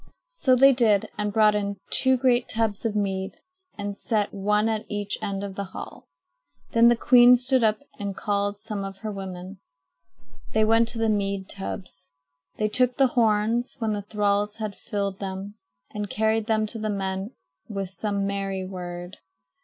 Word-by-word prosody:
So 265 - +2
they 270 +2 +7
did 220 -5 +3
and 210 0 -2
brought 215 0 +4
in 200 -1 -2
two 260 -1 +5
great 250 -1 +2
tubs 220 -1 0
of 220 -2 -1
mead 195 -2 -1 0.4
and 205 -1 -4
set 210 -1 -1
one 210 +2 +1
at 220 -1 -2
each 205 -1 -1
end 195 0 -3
of 200 -1 -5
the 200 +1 -4
hall. - - -9 0.6
Then 230 0 +5
the 240 - +6
queen 245 +1 +7
stood 250 0 +1
up 220 +5 +2 0.2
and 200 -2 -4
called 205 0 -1
some 210 -2 -5
of 195 0 -7
her 215 - -2
women. 190 -1 -7 0.9
They 220 0 +3
went 225 +1 +4
to 235 0 -4
the 225 0 +1
mead 200 -2 0
tubs. 185 -6 -5 0.5
They 215 - +1
took 250 +3 +2
the 270 -2 +4
horns, 225 +1 +1
when 225 -4 -1
the 205 - -3
thralls 205 0 0
had 215 -3 -5
filled 200 -2 -3
them, 195 +1 -5 0.4
and 210 -1 -4
carried 220 0 0
them 220 -1 +2
to 225 +1 -5
the 215 0 -2
men 195 +2 -3 0.3
with 195 -3 -4
some 200 0 -1
merry 195 -1 -2
word. 175 -1 -7
210 Hz, 175 wpm, -25 LUFS, 195-225 Hz, 0.9 s, they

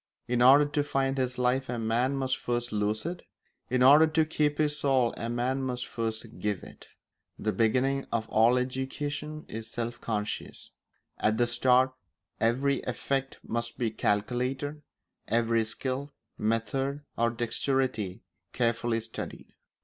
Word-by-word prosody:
In 120 0 +1
order 135 +4 +8
to 145 0 0
find 135 -2 0
his 125 -1 -1
life 125 +2 +1
a 125 - -2
man 115 +4 +1
must 135 -1 0
first 120 -1 -2
lose 105 +2 -1
it; 175 +1 -4 0.5
in 125 0 +2
order 145 +5 +8
to 155 0 +2
keep 150 -1 0
his 150 -1 +2
soul 130 -4 +2
a 115 - -4
man 125 +3 0
must 125 -2 -2
first 115 0 -4
give 105 -3 -2
it. - - -13 0.5
The 110 - -1
beginning 130 +5 +1
of 115 -1 -1
all 115 +3 +4
education 145 +4 -3
is 110 0 -6
self 120 +1 -4
conscious; 105 -2 -4 0.5
at 110 +1 +2
the 120 - +4
start 125 +2 +3 0.5
every 130 +5 +2
effect 135 +2 -2
must 115 0 -3
be 115 -3 0
calculated, 125 +8 -1 0.5
every 115 0 +2
skill, 130 +5 -3 0.2
method, 135 +6 -1
or 115 0 +2
dexterity 120 -3 -1 0.3
carefully 115 -1 +1
studied. 115 0 -7
125 Hz, 140 wpm, -29 LUFS, 115-135 Hz, 0.5 s, order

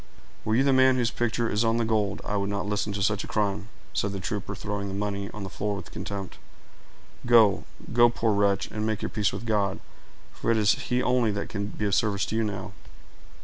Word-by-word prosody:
"Were 110 - +1
you 130 - +4
the 135 -1 +4
man 130 0 +5
whose 120 -2 +1
picture 120 0 0
is 105 +1 +1
on 115 0 +2
the 115 - +1
gold, 105 -3 0
I 105 - -2
would 100 0 0
not 100 0 -2
listen 105 0 -1
to 100 -1 -1
such 105 +1 +1
a - - -7
crime," 105 0 -1 0.2
said 100 0 0
the 100 - -3
trooper, 100 0 -4
throwing 100 0 -3
the 95 - -4
money 100 0 -2
on 105 -2 -7
the - - -4
floor 105 +1 -2
with 100 - -8
contempt. 100 -2 -6 0.9
"Go—go, 120 +1 +4
poor 115 -2 +1
wretch, 100 -1 +2
and 105 - -3
make 110 -1 -1
your - - -1
peace 105 -2 +1
with - - -6
God; 100 -4 0 0.5
for - - -3
it 115 - +4
is 105 -1 +4
He 125 0 0
only 125 -3 +3
that 100 - -3
can 100 -1 -3
be 105 0 -4
of 100 - 0
service 100 0 +2
to - - -3
you 115 - +2
now." 100 -2 -4
105 Hz, 230 wpm, -27 LUFS, 100-115 Hz, 0.9 s, man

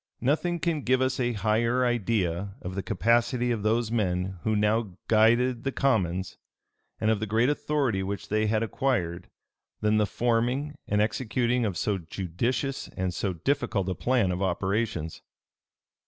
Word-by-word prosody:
Nothing 160 +7 +1
can 160 -2 0
give 130 0 +2
us 130 0 0
a 120 -1 +1
higher 115 +4 +1
idea 100 -5 0
of 90 - -5
the 95 - -2
capacity 120 +5 +1
of 115 -3 -1
those 110 +1 +1
men 95 -4 -1
who 110 -1 0
now 105 -2 +1
guided 115 +2 +4
the 135 - -1
commons, 95 -10 0 0.6
and 110 - +2
of 110 - +1
the 110 - -3
great 115 +5 +2
authority 145 -8 0
which 95 -1 -4
they 110 +1 +1
had 110 +1 +1
acquired, 95 -8 -1 0.5
than 105 0 +3
the 105 -1 +2
forming 120 +6 0
and 105 0 +2
executing 120 +2 0
of 95 -4 -3
so 100 +1 0
judicious 95 - -2
and 95 -1 -1
so 95 +1 -2
difficult 105 - -1
a - - 0
plan 120 -3 +1
of 90 +1 -3
operations. 95 -2 -1
110 Hz, 155 wpm, -27 LUFS, 95-125 Hz, 0.6 s, guided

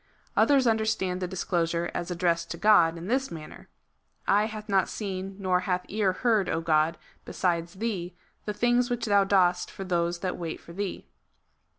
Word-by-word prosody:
Others 275 -3 +4
understand 220 -5 0
the 180 - -1
discourse 175 -2 -1
as 170 +1 -3
addressed 170 -1 0
to 170 - -5
God, 170 -4 +5
in 165 - -7
this 260 +6 0
man 155 -2 -8
ner: - - -14 0.3
" - - -38
Eye 205 +2 +4
hath 215 -1 -8
not 195 -2 +2
seen, 195 -2 -5
nor 185 -2 +1
hath 180 0 -1
ear 205 -2 +1
heard, 215 -1 +1 0.2
God, 160 +1 +2 0.3
besides 170 -1 -1
thee, 190 -5 -3 0.3
the 210 - -2
things 240 +3 +2
which 245 -1 -2
thou 200 -2 +4
dost 180 -3 +2
for 195 - -7
those 175 -1 -1
that 185 -1 -2
wait 165 -2 -4
for 170 - -13
thee." 200 +1 -4
185 Hz, 180 wpm, -27 LUFS, 170-210 Hz, 0.3 s, God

